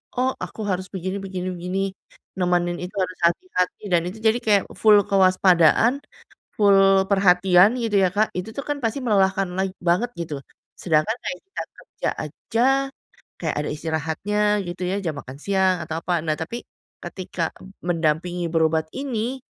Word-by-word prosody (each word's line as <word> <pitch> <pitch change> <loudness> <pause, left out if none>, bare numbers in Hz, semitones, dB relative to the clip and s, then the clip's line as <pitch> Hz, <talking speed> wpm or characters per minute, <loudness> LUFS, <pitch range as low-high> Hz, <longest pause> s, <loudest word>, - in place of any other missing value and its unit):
"Oh, 255 +1 +1
aku 220 - -7
harus 185 0 -2
begini 190 +1 -3
begini 185 -1 -4
begini, 180 +2 -3 0.6
nemenin 175 -1 +1
itu 190 +3 -8
harus 185 0 -5
hati-hati," 180 - -2
dan 175 -1 +4
itu 195 +5 -6
jadi 225 +2 +3
kayak 205 -2 +4 0.2
full 215 -1 +7
kewaspadaan, 185 - +4 0.6
full 195 -2 +5
perhatian, 190 +2 +5
gitu 225 -4 -1
ya 185 - +4
Kak. 215 +1 +3
Itu 180 +4 -4
tuh 280 - -4
kan 290 - 0
pasti 225 +5 0
melelahkan 195 -3 +2
lag 190 0 0 0.2
banget 215 +8 +2
gitu. 165 -3 -4 0.5
Sedangkan 165 +6 +1
kayak 275 - -3
kita 385 - -7 0.2
kerja - - -5 0.2
aja, 220 +9 -3 0.8
kayak - - -1
ada 150 - -3
istirahatnya 160 +6 -2 0.3
gitu 175 +1 -6
ya, 195 - 0
jam 160 -3 -2
makan 130 +2 -10
siang 190 -2 +2
atau 160 +1 -4
apa. 180 - -3
Nah 155 - +1
tapi 235 +9 -5 0.4
ketika 185 -2 -5 0.5
mendampingi 175 +1 0
berobat 160 -1 +2
ini, 260 -1 -3
185 Hz, 155 wpm, -23 LUFS, 175-210 Hz, 0.8 s, full